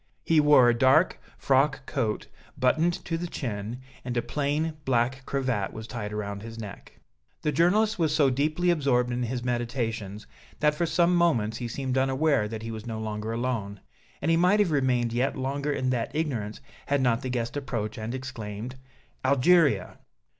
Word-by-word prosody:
He 165 -1 +4
wore 150 -4 +6
a 120 - +5
dark 130 +8 +3 0.2
frock 135 0 +2
coat, 115 -7 -2 0.3
buttoned 160 +7 +1
to 165 -1 -2
the 175 - -3
chin, 115 -4 -5 0.2
and 120 -1 -3
a 120 - +1
plain 150 +4 -1
black 130 +1 0
cravat 130 -8 -1
was 110 0 -7
tied 110 -2 -5
around 100 -1 -4
his 115 +1 -8
neck. 105 -3 -9 0.4
The 150 - +1
journalist 195 +8 +3
was 160 -3 +2
so 145 -3 +3
deeply 155 +7 +1
absorbed 130 -6 +1
in 120 +1 -2
his 120 0 -2
meditations 115 -4 -3 0.3
that 150 0 +3
for 170 +3 -1
some 175 +2 +3
moments 120 -11 +2
he 120 - -4
seemed 130 +2 -1
unaware 135 -3 +2
that 110 0 -6
he 115 - -5
was 110 0 -7
no 110 -1 -4
longer 110 0 -4
alone, 115 -4 -2 0.4
and 165 - +2
he 165 - +4
might 180 +5 +4
have 200 -5 +3
remained 125 -5 +1
yet 125 +4 0
longer 140 +2 -2
in 130 -2 0
that 120 +2 -2
ignorance 120 -10 -2 0.3
had 140 0 +2
not 125 -2 +2
the 130 - -4
guest 120 -1 -2
approached 115 -7 -3
and 110 +3 -4
exclaimed: 125 -2 -6 0.5
"Algeria!" 140 - +3
130 Hz, 175 wpm, -27 LUFS, 115-150 Hz, 0.5 s, wore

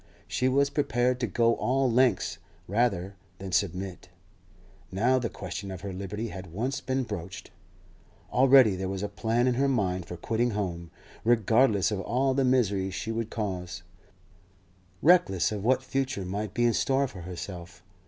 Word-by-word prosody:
She 130 - +1
was 140 +2 +2
prepared 125 -3 +1
to 120 - 0
go 115 +3 +2
all 135 +1 +1
lengths 120 -4 +2 0.3
rather 100 -3 0 0.2
than 95 0 -7
submit, 90 0 -2 0.8
now 120 +7 +2
the 120 -2 -2
question 100 -1 -6
of 95 -2 -7
her 100 -2 -5
liberty 100 +4 -4
had 95 -4 -8
once 125 +10 -2
been 130 0 -1
broached. 90 -6 -7 0.8
Already 130 -5 +6
there 95 0 -3
was 95 0 -4
a - - 0
plan 115 +4 0
in 125 - +3
her 135 +3 +1
mind 95 -9 0
for 90 - -7
quitting 115 +3 -1
home, 85 -4 -3 0.3
regardless 110 -2 +3
of 100 -2 -2
all 130 +7 +1
the 135 +1 +1
misery 105 -7 +2
she 100 +4 -4
would 115 0 -3
cause, 90 -5 -4 1.2
reckless 170 - +4
of 105 -2 -4
what 130 +3 +2
future 135 -6 -2
might 100 +2 -4
be 120 - +2
in 120 - +3
store 135 +3 +1
for 100 -7 -10
herself. 90 0 -8
110 Hz, 165 wpm, -28 LUFS, 95-125 Hz, 1.2 s, Already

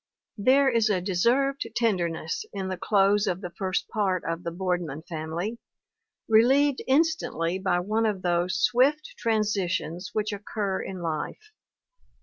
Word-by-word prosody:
There 270 +6 +4
is 230 -4 +3
a 195 -3 +2
deserved 235 +9 +1
tenderness 175 -9 -1
in 190 -2 -3
the 185 - -3
close 200 +2 +3
of 180 -1 -1
the 180 -3 -6
first 185 +1 -2
part 195 -5 0
of 165 +1 -2
The - - -2
Boardman 175 -4 -3
Family, 170 +6 -4 0.7
relieved 265 +5 +4
instantly 265 - +1
by 180 -2 +1
one 215 +4 0
of 200 -3 -2
those 175 +1 +1
swift 285 +5 +2
transitions 195 -5 -1
which 215 -1 -1
occur 200 -1 -3
in 185 -2 -6
life. 165 - -4
195 Hz, 135 wpm, -26 LUFS, 175-230 Hz, 0.7 s, There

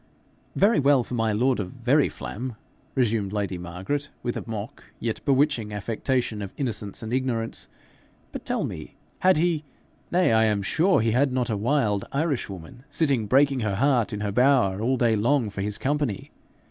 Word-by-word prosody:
'Very 210 +4 +4
well 140 -2 +4
for 125 - -9
my 115 -2 +1
lord 125 +4 +2
of 95 +1 -4
Veryflam!' 130 -3 0 0.4
resumed 110 -6 +1
lady 100 -3 -2
Margaret, 95 - -4
with 120 - -2
a - - -4
mock, 110 +3 -6 0.2
yet 115 -2 -3
bewitching 135 -6 +2
affectation 110 +2 -1
of 100 -1 -7
innocence 115 -7 -3
and 110 +2 -4
ignorance; 125 -3 -1 0.6
'but - - -7
tell - - -1
me - - -6 0.2
had 185 -3 +4
he? 165 -1 +1 0.5
nay, 175 -8 +3
I 110 0 +5
am 105 -2 +1
sure 175 - +3
he 115 0 +1
had 130 +4 +2
not 125 -2 0
a - - 0
wild 105 -2 +1
Irishwoman 120 - -3
sitting 140 -8 +1
breaking 135 +2 +4
her 105 -4 -1
heart 125 -1 +2
in 105 - -4
her 105 -1 -1
bower 125 -5 +3
all 130 +3 +1
day 115 -2 +3
long 115 +1 +1
for 100 - -5
his 105 +1 -2
company. 145 -7 -2
120 Hz, 170 wpm, -25 LUFS, 105-140 Hz, 0.6 s, I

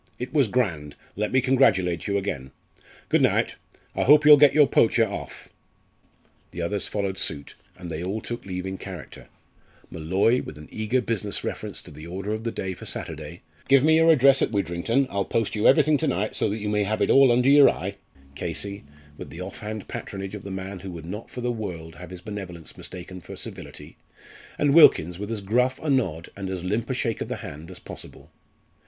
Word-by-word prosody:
It 125 +3 -6
was 140 -6 +4
grand! 85 - -1 0.2
let 105 +1 -2
me 130 - +3
congratulate 110 -11 +2
you 100 -1 +1
again. 80 -10 -4 0.6
Good - - +3
night - - +2 0.4
I - - 0
hope 150 +2 +6
you'll 150 0 +11
get 145 0 +5
your 150 -1 +7
poacher 115 -3 +3
off!" 100 - -8 1.0
The 85 - -9
others 100 +3 -1
followed 100 -2 -3
suit, 70 -2 -3 0.2
and 90 -2 -8
they 80 +2 -4
all 100 +4 -2
took 120 +2 -6
leave 90 -1 -5
in 95 0 -5
character; 90 -6 -9 0.6
Molloy, 95 +9 +1
with 75 - -9
an 75 - -11
eager 110 +4 0
business 105 -3 -2
reference - - -5
to - - -13
the 75 +2 -10
order 95 +4 -4
of 110 +1 -5
the 115 - -1
day 95 -3 -4
for - - -10
Saturday, - - -7 0.2
"Give 135 -1 +5
me 160 +1 +5
your 165 0 +5
address 135 -3 +5
at - - +2
Widrington; 100 +6 0
I'll 100 0 0
post 115 +2 -1
you 105 - +3
everything 150 +3 +5
to - - -1
night, 100 +5 -1
so - - 0
that 105 - -2
you 105 -1 -4
may 105 0 +1
have 110 +2 0
it - - +2
all 135 -2 +7
under 125 +2 +3
your 145 0 +8
eye" - - -4 0.4
Casey, 100 +7 -4 0.4
with - - -8
the 85 - -9
off 95 +2 -7
hand 110 -1 -6
patronage 95 0 -6
of 105 -3 -7
the 100 - -7
man 95 0 -6
who 95 +1 -8
would 80 -2 -8
not 105 +6 -7
for 125 - -7
the 125 0 0
world 90 -8 -6
have 90 - -10
his 90 -1 -9
benevolence 90 -5 -8
mistaken 90 0 -9
for - - -10
servility, - - -10 0.6
and 145 -1 +2
Wilkins 90 - +6
with 105 +1 -5
as 110 -3 -3
gruff 125 +6 +1
a 155 - -1
nod 90 - -1
and 100 -1 -5
as 95 -2 -4
limp 105 +6 -2
a 130 - -1
shake 115 -3 -2
of - - -2
the - - -3
hand 75 +4 -9
as 90 - -10
possible. - - -11
100 Hz, 210 wpm, -25 LUFS, 90-125 Hz, 1.0 s, you'll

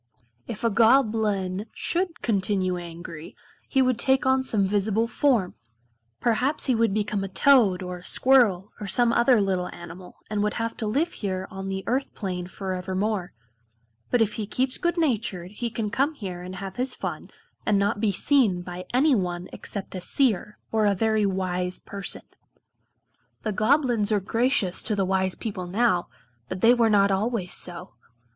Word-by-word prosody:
If 220 -1 -6
a 230 - +2
Goblin 215 -4 +2
should 350 -1 -2
continue 190 -4 +1
angry 170 -2 -8 0.3
he 265 -2 +3
would 255 -2 +1
take 265 +2 +2
on 260 0 +3
some 215 -6 +1
visible 210 +3 +1
form. 235 -8 +1 0.7
Perhaps 250 +6 +1
he 260 - +2
would 230 -2 +2
become 205 -1 -1
a - - -3
toad 200 -4 +4
or 180 0 -5
a - - -17
squirrel, 215 -8 +3
or 205 - -4
some 240 +3 +3
other 240 0 +4
little 190 -3 0
animal, 175 +1 -11
and 210 -1 -2
would 210 0 0
have 230 0 -2
to 220 - -3
live 290 +11 0
here 190 -2 -3
on 195 0 -6
the 190 0 -3
Earth 265 +3 -1
plane 180 -4 -4
forevermore. 190 +1 -3 0.8
But, 240 -2 +4
if 210 - -3
he 215 -2 -4
keeps 255 +4 -1
good 345 0 0
natured, 220 - -1
he 235 +3 -3
can 215 -2 -3
come 285 +6 +1
here 185 -8 -6
and 180 +1 -7
have 195 +2 -7
his 250 0 -1
fun, - - -5 0.3
and 210 -2 +2
not 205 +2 +1
be 215 -3 +2
seen 200 -5 +2
by 180 +1 -7
any 275 +4 +4
one 180 -4 -2
except 200 -2 -6
a 185 - -5
Seer, 215 -2 0
or 215 -2 +3
very 220 0 +2
wise 180 -1 -2
person. 200 -1 -2 1.2
The 215 - -1
Goblins 230 -1 +2
are 210 - +3
gracious 225 -2 +1
to 215 - 0
the 195 -1 +1
wise 190 0 0
people 195 -6 -5
now, 185 -2 +1 0.4
but 185 - -5
they 235 +2 +7
were 235 -2 +3
not 200 -1 +4
always 195 -1 -1
so. 175 -7 -3
210 Hz, 170 wpm, -25 LUFS, 185-235 Hz, 1.2 s, they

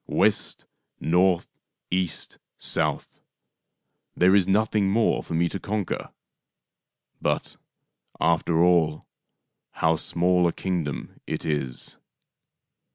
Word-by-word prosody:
West, - - 0 0.3
north, 90 +1 +2 0.4
east, 90 -2 -2 0.2
south, - - -2 0.9
there 90 +2 +5
is 100 -3 +4
nothing 105 0 +2
more 110 +3 +2
for 85 - -5
me 85 +1 +2
to 95 - -4
conquer. 105 0 -3 1.1
But, - - -1 0.6
after 85 0 +2
all, 85 -4 +3 0.7
how 80 0 +2
small 90 +2 +2
a 85 - -1
kingdom 85 -7 -3
it - - -3
is 75 -5 -3
90 Hz, 95 wpm, -25 LUFS, 80-95 Hz, 1.1 s, there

